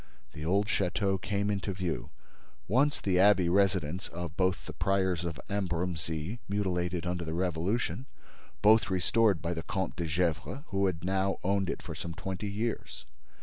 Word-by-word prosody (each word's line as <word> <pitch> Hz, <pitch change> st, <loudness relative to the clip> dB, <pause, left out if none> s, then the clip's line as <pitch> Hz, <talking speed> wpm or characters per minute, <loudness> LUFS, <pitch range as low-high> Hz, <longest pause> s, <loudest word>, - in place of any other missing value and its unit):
The 75 Hz, -, -7 dB
old 100 Hz, +5 st, +2 dB
château 95 Hz, -1 st, 0 dB
came 100 Hz, +1 st, 0 dB
into 100 Hz, -1 st, -2 dB
view—once 90 Hz, -, -2 dB
the 90 Hz, -2 st, +2 dB
abbey 95 Hz, -3 st, +5 dB
residence 95 Hz, -2 st, +2 dB
of 85 Hz, -2 st, -6 dB
the 95 Hz, 0 st, 0 dB
priors 95 Hz, -3 st, +1 dB
of 85 Hz, -3 st, -4 dB
Ambrumésy, 90 Hz, -1 st, -2 dB
mutilated 90 Hz, -3 st, 0 dB
under 90 Hz, 0 st, -1 dB
the 80 Hz, 0 st, -3 dB
Revolution, 95 Hz, -, -1 dB, 0.6 s
both 110 Hz, -1 st, +6 dB
restored 95 Hz, 0 st, +2 dB
by 85 Hz, +1 st, 0 dB
the 80 Hz, -, -3 dB
Comte 95 Hz, +3 st, -3 dB
de 85 Hz, -, -1 dB
Gesvres, 80 Hz, -, -1 dB
who 95 Hz, 0 st, +2 dB
had 85 Hz, -3 st, -2 dB
now 95 Hz, +1 st, +1 dB
owned 95 Hz, 0 st, +1 dB
it -, -, -3 dB
for -, -, -5 dB
some 85 Hz, -1 st, -6 dB
twenty 95 Hz, +3 st, -4 dB
years. 110 Hz, -, -3 dB
95 Hz, 150 wpm, -30 LUFS, 85-100 Hz, 0.6 s, both